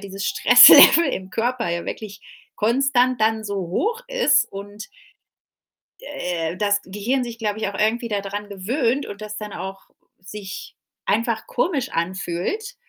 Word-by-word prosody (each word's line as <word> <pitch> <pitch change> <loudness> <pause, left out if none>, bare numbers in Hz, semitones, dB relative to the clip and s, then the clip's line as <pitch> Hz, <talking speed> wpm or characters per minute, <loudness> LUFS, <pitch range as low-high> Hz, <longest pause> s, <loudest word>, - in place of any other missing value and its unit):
dieses 195 0 -7
Stresslevel 335 - +8
im 185 0 -5
Körper 235 0 -2
ja 170 0 -3
wirklich 205 -2 -8 0.3
konstant 250 +1 +1
dann 220 0 +1
so 200 -1 -4
hoch 290 - -2
ist - - +2
und 205 - -9 1.1
äh, 175 - -4
das 205 0 +1
Gehirn 215 +7 -2
sich, 235 -1 -7
glaube 210 -1 -3
ich, 220 - -2
auch 200 - -6
irgendwie 230 +3 0
dadran 205 0 -4
gewöhnt 235 +7 -1
und 205 +1 -9
das 210 0 -7
dann 210 -1 -7
auch 195 0 -8 0.3
sich 190 +1 -9 0.3
einfach 230 0 -1
komisch 280 -1 -1
anfühlt, 185 - -4
210 Hz, 140 wpm, -21 LUFS, 195-245 Hz, 1.1 s, Stresslevel